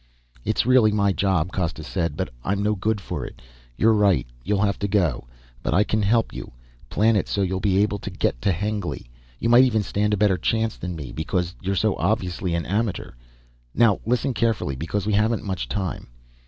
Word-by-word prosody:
"It's 110 Hz, -, 0 dB
really 125 Hz, -4 st, +5 dB
my 100 Hz, -2 st, +2 dB
job," 90 Hz, -1 st, +1 dB
Costa 85 Hz, -4 st, -2 dB
said, 80 Hz, -2 st, -2 dB
"but -, -, -2 dB
I'm 100 Hz, +1 st, -1 dB
no 105 Hz, +1 st, +2 dB
good 105 Hz, +2 st, -1 dB
for 100 Hz, -, -5 dB
it. -, -, -9 dB, 0.4 s
You're 115 Hz, 0 st, +4 dB
right, 100 Hz, -, +3 dB, 0.2 s
you'll 100 Hz, +1 st, +1 dB
have 100 Hz, -1 st, 0 dB
to 100 Hz, -, -1 dB
go. 85 Hz, -, 0 dB, 0.3 s
But -, -, -1 dB
I 105 Hz, -, +5 dB
can 110 Hz, +1 st, 0 dB
help 115 Hz, +3 st, +2 dB
you, -, -, -8 dB, 0.4 s
plan 110 Hz, +1 st, +3 dB
it 100 Hz, -, +1 dB
so 100 Hz, -, 0 dB
you 95 Hz, 0 st, -1 dB
will 95 Hz, -, -1 dB
be 95 Hz, -1 st, +1 dB
able 105 Hz, -1 st, -1 dB
to 100 Hz, -, -6 dB
get 90 Hz, -9 st, -1 dB
to 100 Hz, -, +2 dB
Hengly. 100 Hz, -, -3 dB, 0.3 s
You -, -, -2 dB
might 120 Hz, +2 st, +8 dB
even 110 Hz, -5 st, +2 dB
stand 105 Hz, +1 st, 0 dB
a -, -, -5 dB
better 100 Hz, -3 st, +2 dB
chance 110 Hz, +4 st, 0 dB
than 90 Hz, 0 st, -5 dB
me, 70 Hz, -6 st, -7 dB
because 90 Hz, +2 st, -2 dB
you 95 Hz, -, -2 dB
are -, -, -2 dB
so 105 Hz, +1 st, +1 dB
obviously 90 Hz, -4 st, -1 dB
an 85 Hz, -, -2 dB
amateur. 105 Hz, +1 st, -2 dB, 0.6 s
Now 115 Hz, -5 st, +4 dB
listen 125 Hz, +3 st, 0 dB
carefully, 115 Hz, -, 0 dB
because 85 Hz, +9 st, -3 dB
we 105 Hz, -, 0 dB
haven't 110 Hz, +2 st, +2 dB
much 95 Hz, -, -4 dB
time." 90 Hz, +6 st, -3 dB
100 Hz, 210 wpm, -23 LUFS, 90-110 Hz, 0.6 s, might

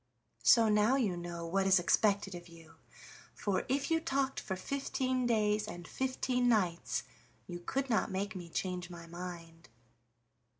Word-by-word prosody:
So 225 Hz, -, +6 dB
now 210 Hz, +4 st, +4 dB
you 220 Hz, -9 st, +1 dB
know 175 Hz, -1 st, -5 dB
what 190 Hz, +3 st, +1 dB
is 190 Hz, 0 st, +6 dB
expected 200 Hz, +2 st, +2 dB
of 175 Hz, 0 st, -8 dB
you, 165 Hz, -1 st, -15 dB, 0.6 s
for 200 Hz, -2 st, -1 dB
if 280 Hz, +4 st, 0 dB
you 325 Hz, -, +4 dB
talked 275 Hz, -3 st, -1 dB
for 190 Hz, -, -4 dB
fifteen 255 Hz, +3 st, -1 dB
days 215 Hz, -2 st, +2 dB
and 175 Hz, -5 st, -8 dB
fifteen 255 Hz, -1 st, 0 dB
nights 185 Hz, -7 st, +1 dB, 0.4 s
you 175 Hz, +6 st, -6 dB
could 265 Hz, +10 st, -2 dB
not 225 Hz, -3 st, +1 dB
make 200 Hz, +2 st, -3 dB
me 175 Hz, -2 st, -7 dB
change 180 Hz, +1 st, -3 dB
my 170 Hz, -1 st, -9 dB
mind." 170 Hz, -1 st, -9 dB
195 Hz, 155 wpm, -33 LUFS, 175-250 Hz, 0.6 s, So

